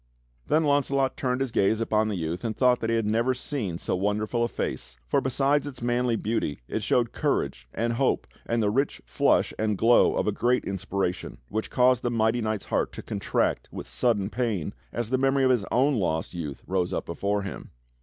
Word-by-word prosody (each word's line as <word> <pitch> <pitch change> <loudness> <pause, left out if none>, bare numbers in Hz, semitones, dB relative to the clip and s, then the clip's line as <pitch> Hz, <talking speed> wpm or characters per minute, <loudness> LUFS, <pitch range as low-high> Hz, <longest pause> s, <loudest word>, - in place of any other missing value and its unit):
Then 155 +2 +3
Launcelot 140 -2 +2
turned 130 -3 -1
his 135 -3 -1
gaze 105 +2 +2
upon 110 -1 +1
the 105 - -2
youth 85 0 -3
and 110 -2 -3
thought 125 -1 +4
that 115 - -2
he 115 - +2
had 115 -2 +1
never 115 +4 +1
seen 120 - -3
so - - -2
wonderful 105 +5 0
a - - +2
face, 60 - -4
for - - +1
besides 135 +2 +1
its 135 -3 -8
manly 120 0 +1
beauty 110 -10 -1
it - - -2
showed 120 -2 +1
courage - - -1
and 115 +1 -1
hope 130 +3 +1 0.2
and 115 -1 +1
the 105 - +2
rich 135 +5 -1
flush - - +2
and 105 -2 0
glow 115 +4 +5
of - - 0
a 105 - +2
great 120 +4 +1
inspiration 95 -1 -3
which 110 +2 -3
caused 125 -1 +3
the 120 - 0
mighty 115 0 +1
knight's 110 -2 -2
heart - - 0
to - - -8
contract - - -1
with - - -7
sudden 100 - 0
pain 110 -9 -1 0.2
as 120 0 -3
the 130 - +2
memory 135 0 +3
of 130 - +5
his 120 -6 +1
own 135 +4 +3
lost 85 -8 -1
youth 75 -6 -6
rose 90 -1 0
up - - -2
before 100 +4 -1
him. 100 - -7
115 Hz, 205 wpm, -26 LUFS, 100-125 Hz, 0.2 s, glow